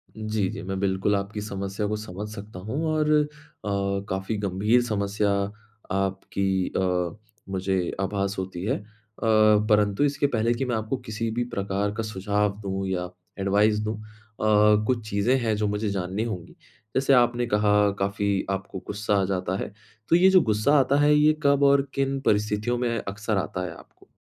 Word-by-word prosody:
जी, 110 -2 -1
जी। - - -6
मैं 95 0 -3
बिल्कुल 100 +1 +1
आपकी 100 +1 -3
समस्या 100 0 -4
को 105 - -1
समझ 105 0 -6
सकता 100 -2 -9
हूँ 130 - -3
और 155 -1 +1
अ, 150 -1 +4 0.8
काफ़ी 95 +3 -2
गंभीर 105 +5 +2
समस्या 105 -2 0 0.6
आपकी 95 0 -1
अ, 90 -1 0 0.3
मुझे 95 0 0 0.2
आभास 100 +1 -1
होती 95 -1 -5
है। 130 - +1
अ, 105 - -13 0.4
परंतु 105 0 +4
इसके 145 0 +2
पहले 115 -2 +1
कि 130 +3 -2
मैं 120 -2 -1
आपको 110 +4 -2
किसी 110 +1 -2
भी 120 +2 -1
प्रकार 100 +1 -1
का 115 - -2
सुझाव 105 0 -1
दूँ 95 0 -3
या 90 -1 -2 0.3
एडवाइस 105 +2 +3
दूँ 110 0 -2
अ, - - -11 0.8
कुछ 115 -4 -1
चीज़ें 100 +6 +2
हैं 110 -3 0
जो 105 -1 0
मुझे 105 +1 -1
जाननी 95 +2 -2
होंगी। 95 -7 -6 0.4
जैसे 135 +1 +3
आपने 120 -1 +3
कहा 105 -1 +3
काफ़ी 100 0 0
आपको 95 -1 -3
गुस्सा 105 0 -1
आ - - +1
जाता 95 -1 -1
है, - - -5 0.4
तो 170 - +6
ये 185 +2 +6
जो 185 -2 +6
गुस्सा 110 +4 +2
आता 135 +1 +2
है 150 0 +5
ये 150 +1 +5
कब 140 0 +4
और 140 0 +6
किन 135 0 0
परिस्थितियों 105 +3 +1
में 120 -1 0
अक्सर 105 +1 -2
आता 90 -1 -2
है 85 - -5
आपको? - - -19
105 Hz, 175 wpm, -25 LUFS, 95-115 Hz, 0.8 s, तो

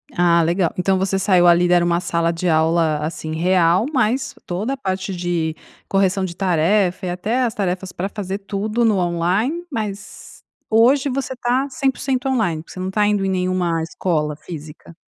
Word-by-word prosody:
Ah 170 -1 +4
legal, 170 +1 +1
então 190 +1 +2
você 190 0 0
saiu 185 -3 +3
ali, 175 +1 +5
era 175 -1 +4
uma 170 0 +1
sala 170 -1 0
de 170 +2 -3
aula 160 -1 +2
assim 155 0 -5
real, 180 +3 +3
mas 260 +2 0
toda 205 +9 -2
a - - -5
parte 190 -4 -3
de 175 -3 -1 0.4
correção 195 0 +2
de 175 -2 -3
tarefa 185 +1 +1
e - - -1
até 215 +8 -1
as 230 - 0
tarefas 185 -1 -2
pra 190 +3 -3
fazer 200 -2 -4
tudo 210 +3 -2
no 210 -3 +3
online, 185 - 0
mas 205 -5 -7 0.3
hoje 260 +6 +4
você 260 0 -3
tá 250 +3 0
100% 265 -1 -1
online, 175 -11 0
você 185 - -10
não 185 +1 -3
tá 210 +1 +1
indo 205 -2 +1
em 195 - 0
nenhuma 180 -3 0
escola 155 -3 -2
física? 160 0 -10
185 Hz, 175 wpm, -20 LUFS, 170-215 Hz, 0.4 s, ali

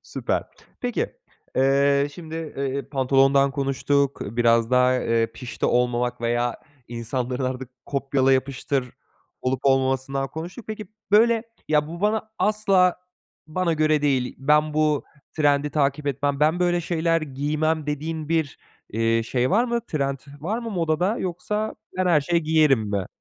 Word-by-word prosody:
Süper. - - -2 0.4
Peki, 255 - -2 0.4
eee, 140 +1 +3
şimdi, 160 -2 -9 0.2
eee, 135 0 -3
pantolondan 135 0 +3
konuştuk, 140 +1 0
biraz 115 +1 +2
da, 125 0 +4
eee, 115 0 +2
pişti 125 -2 -3
olmamak 120 0 +1
veya 120 0 0 0.3
insanların 125 +2 -3
artık 130 0 -4 0.2
kopyala 135 -1 +1
yapıştır 130 -1 -1 0.5
olup 130 0 -1
olmamasından 135 0 +1
konuştuk. 175 +8 -8
Peki, 215 -2 -6 0.2
böyle, 225 +2 +5 0.3
ya 150 -1 +2
bu 170 +1 -7
bana 215 +1 0
asla 195 -2 +3 0.5
bana 170 +2 0
göre 155 -1 +2
değil, 130 -4 +1
ben 150 +3 +2
bu 155 -1 +2 0.3
trendi 145 -1 +2
takip 145 0 0
etmem, 140 +1 -1
ben 160 +4 +3
böyle 175 -1 +2
şeyler 165 0 +1
giymem 155 +2 -1
dediğin 155 +1 -3
bir, 160 -4 0 0.3
eee, 115 +1 +1
şey 125 +2 0
var 230 +5 +4
mı? 235 -1 -1
Trend 140 -3 -1 0.2
var 205 +9 -2
mı 235 -1 -5
modada 175 +3 0
yoksa 210 +4 -3 0.2
ben 185 0 +1
her 165 -4 +4
şeyi 170 +4 0
giyerim 155 -5 +4
mi? 100 -3 -1
145 Hz, 140 wpm, -24 LUFS, 130-165 Hz, 0.5 s, böyle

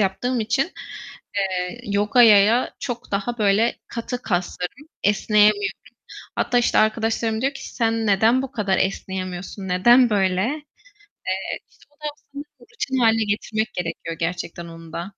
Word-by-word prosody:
yaptığım 230 +5 0
için, 265 +11 0 0.7
eee, 185 -2 -2
yogaya 210 +2 +4
çok 245 0 -5
daha 205 +5 -2
böyle 210 +2 +3
katı 245 +2 -5
kaslarım, 180 - -3 0.2
esneyemiyorum. 210 - +3 0.6
Hatta 245 - +1
işte 240 - +2
arkadaşlarım 220 +1 +1
diyor 270 +2 0
ki: - - -8
"Sen 225 -1 0
neden 220 +6 +4
bu 270 -1 -6
kadar 205 -7 0
esneyemiyorsun, 190 0 -3
neden 240 +7 +5
böyle?" 190 -3 +2
Eee, 295 +4 -5 0.9
işte - - -24
onu 300 +1 -6
aslında 285 0 -11 0.3
rutin 265 - -2
hâle 225 -2 +4
getirmek 220 +2 -2
gerekiyor 165 -1 -4
gerçekten 170 0 -3
onu 165 -1 -12
da. 170 - -4
220 Hz, 130 wpm, -22 LUFS, 190-245 Hz, 0.9 s, neden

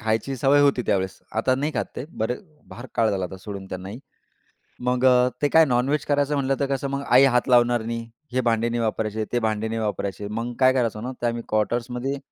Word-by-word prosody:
खायची 110 +5 -1
सवय 140 +3 +4
होती 140 -3 +3
त्यावेळेस 95 -1 0 0.2
आता 120 +4 +2
नाही 145 +4 -2
खात - - 0
ते. - - -4
बरे 115 -1 -2 0.3
फार 120 - -9
काळ 115 -1 +2
झाला 95 -2 -1
आता 90 +1 -7
सोडून 100 0 -7
त्यांनाही. 95 +4 -7 0.8
मग 125 +1 0 0.4
ते 145 - +3
काय 160 +1 +6
नॉनव्हेज 135 +3 +1
करायचं 145 0 +1
म्हटलं 135 -1 +1
तर 140 - +1
कसं 140 +1 -3
मग 140 0 -2
आई 125 +3 +6
हात 125 - +2
लावणार 120 -1 +4
नाही. 115 0 -4 0.2
हे 130 - +2
भांडे 115 -1 +1
नाही 120 0 -1
वापरायचे 110 -1 -1
ते 120 - +3
भांडे 110 -1 -1
नाही 115 0 -3
वापरायचे. 100 -1 -3
मग 115 +3 -4
काय 130 0 +5
करायचं 115 -4 -1
ना, 125 - -3
ते 120 - +1
आम्ही 120 0 -2
क्वाटर्समध्ये 120 +5 -1
120 Hz, 210 wpm, -24 LUFS, 110-130 Hz, 0.8 s, काय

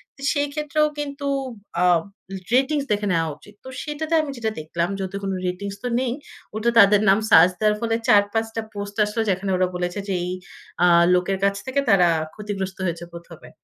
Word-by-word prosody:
তো 275 - -17
সেই 290 -1 0
ক্ষেত্রেও 300 0 +1
কিন্তু 280 0 -5 0.6
আ - - +3 0.7
রেটিংস 275 +2 +2
দেখে 205 0 0
নেওয়া 165 -1 +1
উচিত। 205 - -17
তো - - -7
সেটাতে 310 +2 -4
আমি 290 -2 -5
যেটা 220 -2 -2
দেখলাম 170 +3 -2
যেহেতু 190 0 -5
কোন 195 - -2 0.2
রেটিংস 200 +2 -4
তো - - -1
নেই। 250 -2 -1 0.4
ওটা 225 +2 +1
তাদের 200 +1 +6
নাম 195 +3 +5
সার্চ 185 -3 +7
দেওয়ার 210 -1 +2
ফলে 225 -1 0
৪ 205 -1 +6
৫ 225 0 +1
টা 225 - -1
পোস্ট 200 0 -6
আসলো 210 +2 -2
যেখানে 190 +1 -1
ওরা 185 0 +2
বলেছে 180 +2 -3
যে 195 - -1
এই 180 - -3 0.5
আ - - +7 0.3
লোকের 180 +2 +1
কাছ 200 0 +2
থেকে 260 +2 -1
তারা 185 -3 +5 0.3
ক্ষতিগ্রস্ত 195 -3 -5
হয়েছে 170 -1 -3
প্রথমে। 170 -1 -12
205 Hz, 190 wpm, -22 LUFS, 185-255 Hz, 0.7 s, সার্চ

